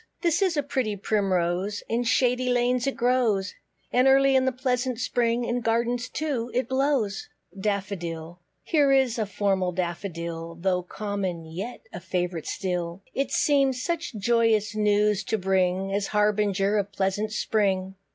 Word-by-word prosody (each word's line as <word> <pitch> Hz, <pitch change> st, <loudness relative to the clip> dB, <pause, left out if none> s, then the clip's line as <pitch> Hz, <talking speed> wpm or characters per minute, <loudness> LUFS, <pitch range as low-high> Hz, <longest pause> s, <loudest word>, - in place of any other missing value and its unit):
This 340 Hz, +2 st, +2 dB
is 370 Hz, -5 st, +2 dB
a 290 Hz, -, +2 dB
pretty 260 Hz, -7 st, -1 dB
Primrose, 195 Hz, -1 st, 0 dB
In 230 Hz, +2 st, 0 dB
shady 250 Hz, +1 st, +2 dB
lanes 245 Hz, +1 st, +1 dB
it 275 Hz, -, -1 dB
grows; 235 Hz, -6 st, +1 dB, 0.4 s
And 250 Hz, +2 st, +4 dB
early 270 Hz, 0 st, +5 dB
in 260 Hz, 0 st, +4 dB
the 260 Hz, -, +2 dB
pleasant 255 Hz, -1 st, -1 dB
spring, 240 Hz, -1 st, 0 dB
In 240 Hz, +1 st, -1 dB
gardens 235 Hz, +2 st, 0 dB
too 275 Hz, -6 st, -2 dB
it 255 Hz, -1 st, +1 dB
blows. 260 Hz, -6 st, 0 dB, 0.3 s
DAFFODIL. 180 Hz, -4 st, -3 dB, 0.2 s
Here 290 Hz, -4 st, +3 dB
is 265 Hz, -4 st, +3 dB
a 215 Hz, -, 0 dB
formal 190 Hz, -2 st, 0 dB
Daffodil, 170 Hz, -2 st, -4 dB
Though 180 Hz, -1 st, +1 dB
common, 190 Hz, -3 st, -4 dB
yet 185 Hz, +10 st, -6 dB
a -, -, -5 dB
favourite 175 Hz, -2 st, -3 dB
still; 180 Hz, 0 st, -3 dB
It 275 Hz, -, -1 dB
seems 275 Hz, -3 st, +2 dB
such 335 Hz, -6 st, -3 dB
joyous 220 Hz, 0 st, +2 dB
news 210 Hz, -1 st, +2 dB
to 220 Hz, -, 0 dB
bring, 190 Hz, 0 st, +1 dB
As 200 Hz, 0 st, 0 dB
harbinger 210 Hz, -1 st, +2 dB
of 200 Hz, 0 st, -3 dB
pleasant 200 Hz, +2 st, -1 dB
Spring. 195 Hz, -3 st, 0 dB
210 Hz, 150 wpm, -26 LUFS, 190-250 Hz, 0.4 s, early